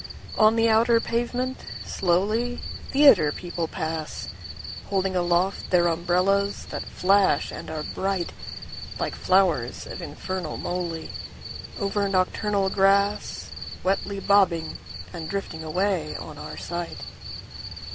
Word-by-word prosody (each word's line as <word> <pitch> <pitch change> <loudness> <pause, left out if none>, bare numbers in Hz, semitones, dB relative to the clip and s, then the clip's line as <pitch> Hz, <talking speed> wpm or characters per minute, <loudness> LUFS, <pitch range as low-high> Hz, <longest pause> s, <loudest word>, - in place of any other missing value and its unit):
On 215 +1 +6
the 230 0 +4
outer 230 +1 +5
pavement, 245 +3 -1 0.3
slowly, 215 +7 +1 0.3
Theatre 275 - +7
people 175 0 -3
pass, 160 - -4 0.6
Holding 190 -1 0
aloft 175 +2 +1
their 175 -1 +4
umbrellas 180 +4 +2
that - - -3
flash 195 +1 +3
and - - -7
are 155 -1 -3
brightLike 190 0 -4
flowers 180 -11 +2
of - - -7
infernal 185 -4 -4
molyOver 180 +3 -3
nocturnal 195 +1 +1
grassWetly 195 0 0
bobbing 185 -6 +3 0.3
and 165 -2 -5
drifting 195 -5 -3
away 175 -1 0
on 150 -1 -7
our - - -7
sight. 175 0 -4
190 Hz, 100 wpm, -26 LUFS, 170-200 Hz, 0.6 s, Theatre